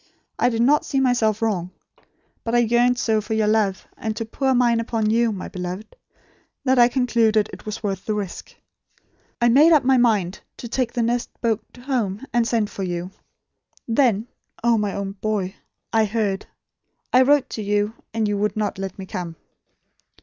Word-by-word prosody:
I - - +4
did 230 -1 +1
not 295 +4 +4
see 270 - -1
myself 235 -4 +2
wrong; 185 -6 0 0.7
but 230 +1 -1
I - - +5
yearned 240 +1 +3
so 220 -2 +1
for 220 +1 -3
your 220 -1 +2
love, 210 -3 +1
and 220 -1 -4
to 225 - -3
pour 265 +4 0
mine 240 -2 +3
upon 225 -2 0
you, 230 0 +3
my 195 -3 -5
beloved, 180 - -6 0.7
that 260 -1 +3
I 240 - +8
concluded 230 -4 +2
it - - -11
was 215 +1 -5
worth 195 -2 -3
the 215 - 0
risk. 200 -4 -6 0.8
I 240 - +3
made 285 +8 +6
up 300 -3 +5
my 260 +1 +4
mind 210 -7 +2 0.2
to 235 - -7
take 240 0 -1
the 240 -2 0
next 240 +1 0
boat 230 -3 0 0.2
home, 240 -4 -2
and 240 -1 +2
send 220 -3 0
for - - -6
you. 175 0 -3 0.8
Then 230 -3 +2 0.4
oh, 235 -1 +4
my 210 -2 0
own 200 -1 -3
boy 195 -2 -2 0.4
I 220 -1 +4
heard. 205 -2 -1 0.7
I 255 - +7
wrote 275 0 +4
to 220 - -4
you; 205 +1 0 0.2
and 220 -1 0
you 205 -1 -1
would 210 +1 -1
not 210 -2 -2
let 195 -1 -5
me 190 - -7
come." 180 -4 -5
220 Hz, 185 wpm, -22 LUFS, 205-240 Hz, 0.8 s, I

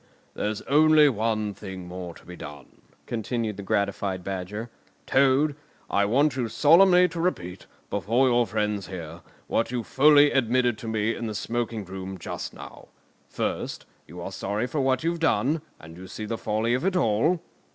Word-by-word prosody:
"There's 105 0 -3
only 155 +1 +5
one 110 -3 -1
thing 95 -3 -8
more 90 -1 -7
to - - -17
be 90 - -9
done," 75 -4 -11 0.2
continued 115 -1 -2
the - - -5
gratified 100 -1 -1
Badger. 100 +5 -5 0.3
"Toad, 140 +2 +3 0.4
I 100 - +3
want 135 +6 +2
you 125 -3 -1
solemnly 180 - +6
to 165 0 -4
repeat, 90 - -3 0.2
before 120 +5 +2
your 120 -2 +3
friends 105 -1 -1
here, 85 -2 -8 0.2
what 115 - 0
you 120 -1 -2
fully 145 +4 +5
admitted 125 -2 +2
to 115 - -7
me 110 0 0
in 115 - -4
the 105 - -4
smoking 115 -1 -3
room 95 +1 -7
just 85 - -6
now. - - -12 0.4
First, - - -3 0.2
you 90 +3 -10
are 95 - -5
sorry 100 +4 -2
for 140 +3 -2
what 130 0 +1
you've 170 +1 -1
done, 160 -1 +1 0.2
and 80 +1 -12
you 95 +2 -10
see 110 - -6
the 115 - -3
folly 110 +3 0
of 125 - 0
it 190 0 +1
all?" 155 +3 +2
115 Hz, 170 wpm, -26 LUFS, 100-135 Hz, 0.4 s, solemnly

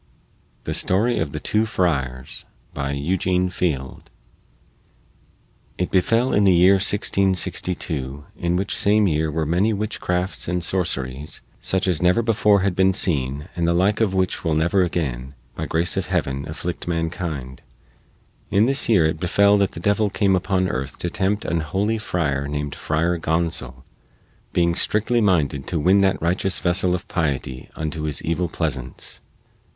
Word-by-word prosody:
THE - - -3
STORY 110 +7 +1
OF - - -2
THE - - -4
TWO 110 +1 0
FRIARS 70 - -2 0.3
BY 70 -1 -3
EUGENE 90 +5 0
FIELD 75 -7 -3 1.7
It 90 - -2
befell 115 +7 +2
in 105 - +3
the 95 -2 +5
year 90 +3 +6
1662, 90 -8 0
in 85 0 -1
which 95 +3 -1
same 105 +1 +3
year 80 -1 0
were 80 +1 -1
many 90 +8 +1
witchcrafts 95 -3 -2
and 90 0 -1
sorceries, 75 -6 -3 0.2
such 95 0 0
as 90 -5 +1
never 90 +6 +3
before 105 -3 +3
had 95 -2 0
been 95 0 +3
seen 70 -3 +1
and 85 -1 0
the 85 - +2
like 100 +5 +2
of 100 -4 +1
which 95 -1 0
will 80 -3 +1
never 85 +5 +2
again, 70 -7 -3 0.2
by - - -5
grace 80 +1 +1
of - - -2
Heaven, 70 +2 -2
afflict 85 +3 -5
mankind 80 -6 -3 0.9
in 100 +2 +3
this 135 0 0
year 95 -8 +5
it 80 0 -1
befell 100 +3 +4
that 100 -1 +1
the - - -7
devil 105 +3 +1
came 100 -1 +2
upon 95 0 0
earth 65 -5 -4
to 85 - -3
tempt 100 +3 -1
an 85 - 0
holy 100 +9 -1
friar, 70 -9 -1
named 75 0 -3
Friar 85 +2 -1
Gonsol, 80 -7 -2 0.7
being 85 -1 +2
strictly 110 +6 +1
minded 75 -9 +1
to 85 - -1
win 95 +6 +4
that 95 -1 +2
righteous 90 +2 +2
vessel 90 0 +1
of 90 - -7
piety 70 -6 -3
unto 80 0 -4
his 75 -2 -3
evil 85 +2 -1
pleasance. 70 -8 -4
90 Hz, 155 wpm, -22 LUFS, 75-95 Hz, 1.7 s, year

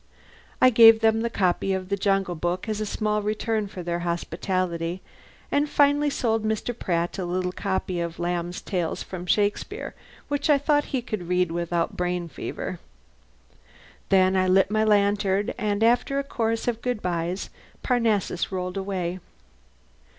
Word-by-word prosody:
I 255 - +6
gave 225 -1 +8
them 225 0 +3
the 235 - 0
copy 190 -2 +1
of 185 -1 -3
the 200 - +1
"Jungle 195 -2 +1
Book" 175 +4 -2
as 215 -1 -2
a 215 - -2
small 210 0 -1
return 215 0 -1
for 185 -2 -8
their 170 0 -2
hospitality, 175 0 -2 0.5
and 290 +1 +1
finally 290 +1 +3
sold 225 -5 0
Mr. 220 +2 -2
Pratt 175 -3 -2
a - - -1
little 180 +1 -1
copy 190 -2 -2
of 170 -1 -3
"Lamb's 175 0 -2
Tales 175 -5 -2
from 180 -1 -7
Shakespeare" 210 - 0 0.3
which 290 +1 -1
I 295 - +6
thought 290 +1 +2
he 260 -3 -2
could 210 -7 -5
read 180 -1 +2
without 170 0 -1
brain 180 -1 -1
fever. - - -6 1.3
Then 190 -1 +4
I 185 0 +2
lit 190 +2 +4
my 215 0 +2
lantern 205 -1 +2
and 210 0 -1
after 245 +4 +2
a 280 - 0
chorus 230 -4 -2
of 230 -1 -1
good 245 -4 -2
byes 175 +1 -2 0.3
Parnassus 220 -8 0
rolled 180 0 -3
away. 185 -2 -3
195 Hz, 160 wpm, -25 LUFS, 180-225 Hz, 1.3 s, gave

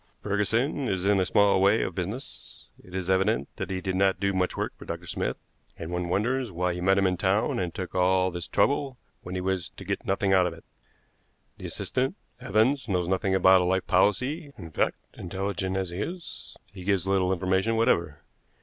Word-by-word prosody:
Ferguson 115 +7 0
is 95 -3 -1
in 100 -1 +4
a 90 - +1
small 100 -2 +4
way 100 +3 +4
of 95 - -3
business; 100 +10 -6
it 90 - -11
is 95 -2 -3
evident 95 -4 +2
that - - -4
he 95 -1 -2
did 95 0 -2
not 95 +1 +2
do 100 0 +1
much 95 -1 0
work - - -2
for - - -12
Dr. - - -6
Smith, - - -2 0.4
and 80 +1 -6
one 90 0 -2
wonders 120 +5 0
why 90 0 -1
he 90 - -5
met 95 +2 +3
him 100 - +3
in 90 -1 +1
town 100 +4 +1
and 90 -2 -2
took 95 +1 -6
all 95 0 +3
this 90 0 -5
trouble 140 -2 +1 0.2
when 90 - -7
he 90 - -2
was 95 -2 -1
to - - -12
get - - -2
nothing 95 0 +1
out 90 -1 +5
of 85 - -4
it. 80 - -17 0.9
The - - -6
assistant, 130 +7 -2 0.2
Evans, 125 +3 +1
knows 90 -3 0
nothing 95 +1 +1
about 95 0 +6
a - - +1
life 95 +1 +1
policy; 130 - +1
in 85 -5 -9
fact, - - 0 0.2
intelligent 95 +1 -3
as 95 -2 -2
he 90 - -5
is, 175 +8 -7 0.2
he 95 -3 -9
gives 95 -2 +1
little 95 -1 +2
information 95 +4 +1
whatever. 85 -9 +1
95 Hz, 205 wpm, -27 LUFS, 90-105 Hz, 0.9 s, about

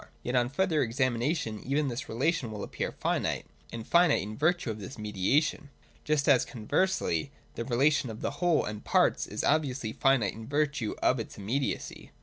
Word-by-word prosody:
Yet, 125 - -2
on 120 -1 +3
further 160 +1 +1
examination 120 -1 0
even 140 +3 0
this 125 +1 -4
relation 135 +1 0
will 105 -1 -5
appear - - -3
finite, - - -1 0.3
and 115 -1 -6
finite 170 - +4
in 105 +2 -6
virtue 160 -3 +1
of 110 - -7
this 105 +6 -8
me 105 -1 -5
diation: 140 +9 +1 0.3
just 150 -2 +1
as, 135 -4 +5
conversely, 115 - 0 0.2
the 115 - -4
relation 135 +2 +2
of 110 0 -8
whole 175 -3 +1
and 105 -1 -6
parts - - +2
is - - -4
obviously 135 -7 +1
finite 135 -8 +2
in 110 0 -9
virtue 145 -5 0
of 130 - +3
its 115 - -7
immediacy. 120 +7 -3
130 Hz, 170 wpm, -29 LUFS, 110-150 Hz, 0.3 s, as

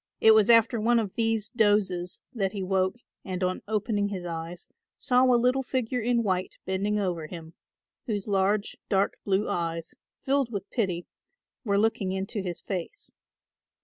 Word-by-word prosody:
It 220 - +7
was 220 0 +5
after 230 0 +5
one 240 +2 +3
of 215 -5 -1
these 225 -2 0
dozes 205 -5 +1
that 195 -5 -1
he 200 -2 -3
woke 185 +1 +1 0.3
and, 185 -1 -3
on 185 0 -1
opening 210 -1 0
his 190 -3 -5
eyes, 170 +1 -6 0.3
saw 250 0 +3
a 250 -1 +5
little 250 +3 +2
figure 250 -1 -2
in 235 0 +1
white 185 -2 -1
bending 195 +3 0
over 175 -6 -2
him, 165 -1 -9 0.5
whose 205 -3 -2
large 200 +1 +1
dark 195 0 +1
blue 200 +1 +1
eyes, 165 +3 -3 0.3
filled 270 -3 +1
with 200 -2 -4
pity, 185 -7 -1 0.6
were 200 -4 +1
looking 215 -3 +1
into 195 +2 -3
his 180 -3 -5
face. 195 - -6
200 Hz, 160 wpm, -27 LUFS, 185-225 Hz, 0.6 s, It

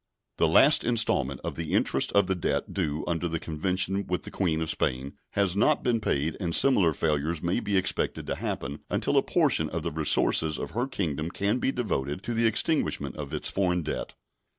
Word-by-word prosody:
The - - +3
last - - +6
installment 110 - +2
of - - -4
the 80 -1 -4
interest - - +1
of 100 -1 +4
the 95 - 0
debt 90 - -2
due 75 +1 -2
under 85 0 -1
the 85 0 -2
convention 95 +5 -2
with 90 - -2
the - - -9
Queen 85 -5 0
of 80 -1 -1
Spain 65 +2 -2 0.2
has 100 -3 +1
not 100 - +2
been 120 -2 +1
paid 75 -3 -1
and 85 -4 -1
similar 100 -12 +4
failures 75 +2 -1
may 85 +1 0
be 100 -1 -1
expected 95 -1 -1
to - - -2
happen 70 +2 -4
until - - 0
a - - +5
portion - - +1
of - - -4
the - - -2
resources 80 0 +2
of - - -5
her 120 +4 -1
Kingdom 80 - -3
can 100 +6 -1
be 130 - 0
devoted 85 - -3
to 120 - -3
the 115 0 +3
extinguishment 150 +8 0
of 70 -2 -7
its 75 - -3
foreign 90 -3 0
debt. 75 - -5
85 Hz, 200 wpm, -27 LUFS, 75-100 Hz, 0.2 s, last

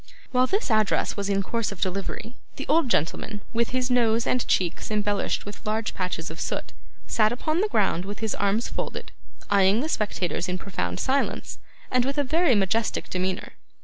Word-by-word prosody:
While 255 0 +4
this 395 - 0
address 215 -1 +2
was 200 -1 -2
in 195 0 +2
course 230 +2 -1
of 200 - -8
delivery, 195 +4 -2 0.2
the 275 - -5
old 305 -2 +3
gentleman, 205 +3 0
with 235 0 +1
his 255 0 0
nose 230 -2 +3
and 250 - +1
cheeks 175 -3 +1
embellished 205 -1 0
with 205 +2 -8
large 220 0 -1
patches 180 -3 -3
of 165 - -7
soot, - - -3 0.3
sat 215 -1 +3
upon 310 +7 0
the 425 - +3
ground 195 - +1
with 205 +1 -5
his 220 -1 -1
arms 205 +3 +1
folded, - - -5 0.4
eyeing 200 +2 +5
the 305 - -1
spectators 185 - -1
in 180 - -1
profound 90 - -3
silence, 275 +1 0 0.3
and 250 -1 +4
with 275 +3 -2
a 290 - +3
very 310 0 +3
majestic 210 +3 0
demeanour. 185 0 -2
215 Hz, 180 wpm, -26 LUFS, 195-250 Hz, 0.4 s, eyeing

